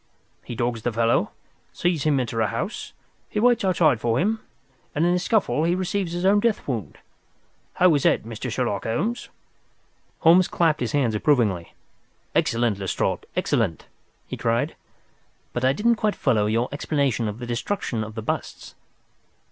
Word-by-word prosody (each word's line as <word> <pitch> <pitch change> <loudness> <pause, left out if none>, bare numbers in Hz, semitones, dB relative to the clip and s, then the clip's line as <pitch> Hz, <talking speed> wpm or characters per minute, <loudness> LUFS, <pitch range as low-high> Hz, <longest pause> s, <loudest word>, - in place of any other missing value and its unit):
He 120 - -7
dogs 120 -1 -1
the 120 - -1
fellow, 115 +1 +2 0.4
he - - -26
sees 175 -5 0
him 145 -3 +3
enter 115 -2 -1
a 110 - +2
house, 115 - -4 0.4
he 210 - -2
waits 240 0 +3
outside 165 - +3
for 115 +1 +1
him, 220 +4 +1 0.6
and 155 +3 +2
in 175 - +3
the 180 - +2
scuffle 195 -6 +1
he 170 +2 +2
receives 185 -1 -2
his 175 +1 -2
own 200 +2 +5
death 225 0 0
wound. 115 - -4 0.8
How 180 -2 +4
is 145 - +2
that, - - +2
Mr. 115 +3 -6
Sherlock 115 -5 -1
Holmes?" 210 - -2 0.9
Holmes 175 +3 +6
clapped 160 -3 +1
his 120 - -2
hands 130 -6 +2
approvingly. 105 - +1 0.6
"Excellent, 115 -3 +1
Lestrade, 95 -1 -2
excellent!" 80 - 0 0.4
he - - -6
cried. 115 0 0 0.8
"But 120 - -2
I 130 - +4
didn't 230 +9 +2
quite 210 -1 0
follow 105 -2 +2
your 115 +3 +1
explanation 140 -5 0
of 105 0 -4
the 120 - -6
destruction 120 - -2
of 110 0 -8
the 110 - -5
busts." - - -4
130 Hz, 165 wpm, -24 LUFS, 115-180 Hz, 0.9 s, Holmes